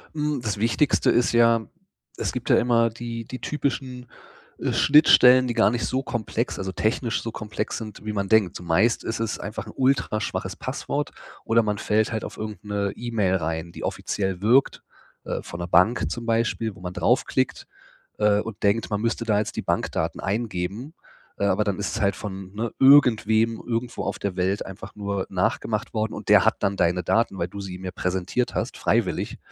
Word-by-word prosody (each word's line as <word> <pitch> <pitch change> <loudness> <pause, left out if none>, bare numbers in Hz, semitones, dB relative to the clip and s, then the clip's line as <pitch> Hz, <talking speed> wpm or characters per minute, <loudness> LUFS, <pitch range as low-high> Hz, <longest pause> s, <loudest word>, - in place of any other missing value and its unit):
Hm, 150 -3 -1
das 110 -3 -2
Wichtigste 115 +6 +2
ist 120 - +2
ja, 115 -1 +4 0.5
es - - -2
gibt - - -5
ja - - +6
immer 115 -1 +3
die 115 0 -6
die 130 - -7
typischen, 130 -4 -3 0.5
äh, - - -1
Schnittstellen, 130 -4 +6
die 120 - -1
gar 105 - +4
nicht 120 +1 -1
so 130 - -1
komplex, 120 -1 -3
also 95 0 -3
technisch 110 +4 -1
so 115 - -5
komplex 105 0 -4
sind, 110 -3 -8
wie 105 - -3
man 100 -1 -2
denkt. 105 -4 +3
Zumeist 90 +7 +1
ist 115 0 -3
es 115 -1 -2
einfach 105 +2 -6
'n - - -9
ultraschwaches 130 -5 0
Passwort - - -3 0.3
oder 115 0 +3
man 105 -1 -1
fällt 110 +3 +1
halt 110 -2 -3
auf - - -9
irgend 110 0 -6
'ne 100 -1 -1
E-Mail 110 -6 0
rein, 80 0 -3
die - - -9
offiziell 95 -3 -2
wirkt, 120 +6 +3 0.4
äh, - - -3
von 85 - -8
der 85 - -4
Bank 90 +8 +3
zum 120 -1 -5
Beispiel, 115 -2 0
wo - - -15
man 90 -1 -5
draufklickt, - - 0 0.5
äh, 105 -1 +3
und 110 -2 -8
denkt, 105 +3 +2
man 105 -1 -1
müsste 115 0 -1
da 110 -3 +2
jetzt 105 - -3
die - - -2
Bankdaten - - -2
eingeben. 105 - -3 0.4
Äh, 100 - 0
aber 100 +2 +2
dann 100 -2 -2
ist 100 - -2
es - - -3
halt 100 -2 +2
von, 95 -2 -7
ne, 110 +2 -3
irgendwem 115 -5 +5
irgendwo 120 0 -3
auf - - -3
der 100 -3 -3
Welt 95 +2 0
einfach 95 +1 -9
nur 100 -2 -3
nachgemacht 105 +3 -1
worden. 110 -1 -1
Und - - -8
der - - +6
hat - - +3
dann 100 - +1
deine 90 0 +1
Daten, 110 +2 +1
weil 85 - -1
du 100 +2 -8
sie 95 -2 -6
ihm 95 +1 -9
ja 90 - -3
präsentiert 95 +7 -2
hast, - - -2
freiwillig. - - 0
110 Hz, 195 wpm, -24 LUFS, 100-115 Hz, 0.5 s, ja